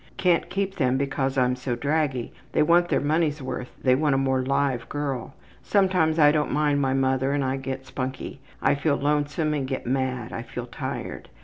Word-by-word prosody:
Can't 180 Hz, -2 st, +2 dB
keep 195 Hz, 0 st, -2 dB
them 130 Hz, -3 st, +2 dB
because 135 Hz, -1 st, -1 dB
I'm 125 Hz, -1 st, +3 dB
so 125 Hz, -1 st, -3 dB
draggy. 140 Hz, -1 st, -1 dB, 0.2 s
They -, -, +4 dB
want 175 Hz, +2 st, +4 dB
their -, -, +2 dB
money's 155 Hz, 0 st, +1 dB
worth 130 Hz, -2 st, -6 dB
they 130 Hz, -, +5 dB
want 145 Hz, +1 st, +2 dB
a -, -, +2 dB
more 135 Hz, -1 st, +1 dB
live 135 Hz, -2 st, 0 dB
girl. 140 Hz, -3 st, -3 dB, 0.3 s
Sometimes 185 Hz, -5 st, +2 dB
I 150 Hz, -2 st, +7 dB
don't 150 Hz, -1 st, 0 dB
mind 145 Hz, -1 st, +2 dB
my 135 Hz, -1 st, +1 dB
mother 135 Hz, 0 st, +1 dB
and 145 Hz, -1 st, +1 dB
I 130 Hz, +1 st, 0 dB
get 135 Hz, 0 st, -5 dB
spunky. 130 Hz, 0 st, -5 dB, 0.2 s
I -, -, +4 dB
feel 140 Hz, +1 st, +1 dB
lonesome 145 Hz, +1 st, 0 dB
and 140 Hz, -3 st, -1 dB
get 130 Hz, 0 st, -4 dB
mad. 130 Hz, -2 st, -1 dB
I -, -, -3 dB
feel 120 Hz, +1 st, -6 dB
tired. 120 Hz, -, -6 dB
140 Hz, 195 wpm, -25 LUFS, 130-150 Hz, 0.3 s, I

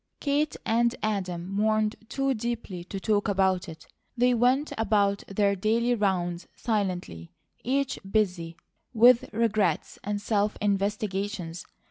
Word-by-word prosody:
Kate 290 Hz, +1 st, 0 dB
and 235 Hz, +2 st, +2 dB
Adam 185 Hz, -5 st, -2 dB
mourned 215 Hz, +2 st, +1 dB
too 270 Hz, +1 st, 0 dB
deeply 220 Hz, -6 st, -4 dB
to 195 Hz, +2 st, -6 dB
talk 205 Hz, +1 st, +1 dB
about 190 Hz, -2 st, +1 dB
it. 160 Hz, -1 st, -11 dB, 0.3 s
They 250 Hz, +1 st, +4 dB
went 250 Hz, +5 st, +2 dB
about 200 Hz, -2 st, +1 dB
their 200 Hz, 0 st, +1 dB
daily 230 Hz, +5 st, +1 dB
rounds 180 Hz, -5 st, -1 dB
silently, 180 Hz, -, -2 dB, 0.3 s
each 270 Hz, +2 st, 0 dB
busy 180 Hz, -6 st, 0 dB, 0.4 s
with 240 Hz, +2 st, +6 dB
regrets 215 Hz, -7 st, 0 dB
and 205 Hz, 0 st, -2 dB
self 205 Hz, 0 st, 0 dB
investigations. 200 Hz, -3 st, -2 dB
205 Hz, 120 wpm, -27 LUFS, 190-230 Hz, 0.4 s, with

